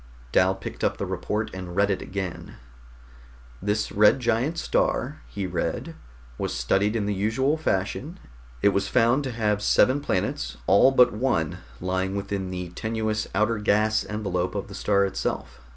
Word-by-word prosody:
Dal 95 +1 +4
picked 95 - -7
up - - +1
the - - -2
report 110 +1 -2
and 90 -2 -7
read 100 +1 +3
it 95 - -1
again. 95 -2 -5 1.1
"This 105 +2 -1
red 105 +5 +5
giant 120 +7 0
star," 150 -3 0
he 100 -2 -4
read, 90 -1 -3 0.5
"was - - -2
studied 95 - +1
in 110 -3 0
the 105 - 0
usual 110 +9 +1
fashion. 145 - -2 0.4
It - - +7
was 100 0 0
found 120 +4 +3
to 130 - -2
have 105 -3 0
seven 130 +6 +4
planets, 95 -9 -2
all 100 +8 +6
but 125 -4 +5
one 105 - 0 0.2
lying 95 +1 -1
within 100 -1 -3
the 90 -1 -5
tenuous 110 +3 -2
outer 105 +2 +2
gas 110 +1 +2
envelope 95 -3 -2
of 100 - -4
the - - -9
star 100 0 +2
itself. 95 - -4
105 Hz, 160 wpm, -25 LUFS, 95-115 Hz, 1.1 s, It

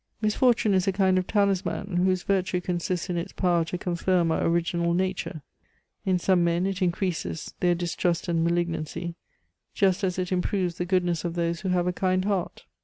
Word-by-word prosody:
Misfortune 220 0 +2
is 185 0 +2
a - - +4
kind 190 -1 +3
of 185 - -4
talisman 200 -2 0
whose 185 0 +2
virtue 185 -2 0
consists 180 0 -2
in 175 - -1
its 170 - -4
power 175 -3 +2
to 180 - -4
confirm 175 -1 +1
our - - 0
original 170 0 +1
nature; 185 -4 -2 0.6
in 185 -1 +3
some 180 0 +2
men 170 +1 +1
it 195 0 -2
increases 180 -2 -2
their 175 -1 +3
distrust 175 0 -1
and 165 -1 +1
malignancy, 170 0 -1 0.6
just 190 -1 +2
as 185 -2 0
it 185 0 -2
improves 180 -1 -1
the 175 - 0
goodness 175 -2 +1
of 170 -1 -3
those 170 -1 -1
who 190 - -2
have 180 -1 +2
a 180 - 0
kind 185 0 0
heart. 195 -4 -2
180 Hz, 180 wpm, -26 LUFS, 170-190 Hz, 0.6 s, a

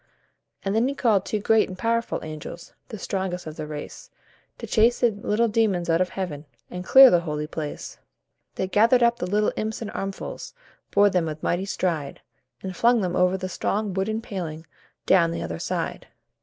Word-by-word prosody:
And 195 - -1
then 230 +3 +3
he 280 - -2
called 215 -8 +2
two 215 - -1
great 220 +1 +3
and 185 - -8
powerful 230 +2 -1
angels, 155 +2 -8
The 220 - -7
strongest 190 -2 -3
of 155 -1 -7
the 155 -1 -6
race, 150 -1 -8 0.5
To - - -7
chase 230 +2 +3
the 240 -2 +4
little 210 +2 0
demons 205 -6 +1
out 165 +2 +3
of 185 - +1
Heaven, 160 -6 -5 0.3
And 180 0 -5
clear 265 +6 +9
the 175 - +5
holy 150 -3 -3
place. 150 -1 -6 0.6
They 190 - -2
gathered 230 +5 +4
up 235 0 +3
the 180 - -3
little 210 +2 +1
imps 220 0 -3
in 220 - -5
armfuls, 195 - -6 0.3
Bore 205 0 +4
them 180 -4 +1
with 155 0 -6
mighty 180 +3 0
stride, 165 -7 -2 0.4
And 190 -1 -5
flung 235 +2 +3
them 180 -2 -1
over 180 +1 +3
the 185 0 -4
strong 200 +2 -2
wooden 215 +4 -1
paling 165 -7 -6 0.4
Down 180 -3 +5
on 165 - -2
the - - -4
other 85 0 -5
side. - - -3
190 Hz, 195 wpm, -24 LUFS, 170-220 Hz, 0.6 s, clear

